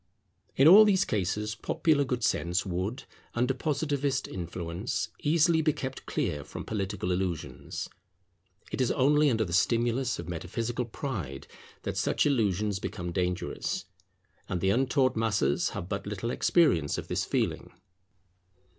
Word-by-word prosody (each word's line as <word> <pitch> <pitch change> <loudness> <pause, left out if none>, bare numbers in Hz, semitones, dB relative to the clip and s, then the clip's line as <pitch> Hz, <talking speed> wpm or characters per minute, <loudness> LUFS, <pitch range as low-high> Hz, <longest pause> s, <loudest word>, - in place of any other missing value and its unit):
In 135 - +6
all 200 +6 +10
these 195 -3 +3
cases 105 +2 -1
popular 150 +3 +1
good 125 -3 -2
sense 90 -3 +1
would, 95 +7 -3 0.3
under 125 +2 +2
Positivist 140 -1 -1
influence, 85 +3 -4
easily 160 +1 +3
be 155 -1 +2
kept 130 -1 -6
clear 75 -1 -1
from - - -8
political 95 -3 -2
illusions. 90 -3 -3 0.8
It - - -2
is 125 - +2
only 145 +2 +4
under 110 -3 +1
the 85 - -6
stimulus 120 +6 +1
of 85 - -7
metaphysical 115 +9 -3
pride 100 - -5 0.4
that - - -3
such - - +1
illusions 105 -7 +1
become 90 -1 -4
dangerous; 90 0 -2 0.6
and 90 - -1
the 95 +3 +2
untaught 130 +2 +2
masses 105 -11 +1
have 85 - -5
but 100 +1 -4
little 105 +3 -3
experience 105 - +3
of - - -5
this - - -1
feeling. - - -1
110 Hz, 135 wpm, -29 LUFS, 90-135 Hz, 0.8 s, all